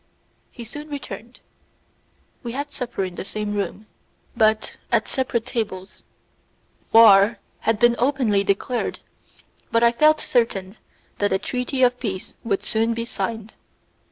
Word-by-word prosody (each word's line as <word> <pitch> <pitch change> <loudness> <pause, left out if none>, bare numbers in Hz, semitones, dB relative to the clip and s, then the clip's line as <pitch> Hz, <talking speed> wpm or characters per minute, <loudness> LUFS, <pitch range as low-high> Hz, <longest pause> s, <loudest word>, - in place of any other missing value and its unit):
He 240 - -10
soon 295 +6 -9
returned; 240 -4 -8 1.0
we 235 -2 -5
had 285 +2 -4
supper 245 -8 -3
in 185 -1 -4
the - - -6
same 210 +1 -4
room, 205 +1 -3 0.5
but 220 -1 +2
at 230 -2 +2
separate 245 -3 -1
tables; 205 -6 -4 0.9
war 220 -1 +7 0.2
had 225 -1 +1
been 240 +2 +4
openly 245 -6 +2
declared, 200 +5 -1 0.7
but 230 +1 +3
I 235 - +6
felt 305 +5 +4
certain 210 -5 0 0.4
that 205 - +1
a 190 - +3
treaty 250 +5 -2
of 250 0 +3
peace 190 -6 -4
would 200 -3 -1
soon 225 +2 +1
be 230 0 -3
signed. 225 -2 -4
230 Hz, 135 wpm, -23 LUFS, 205-245 Hz, 1.0 s, war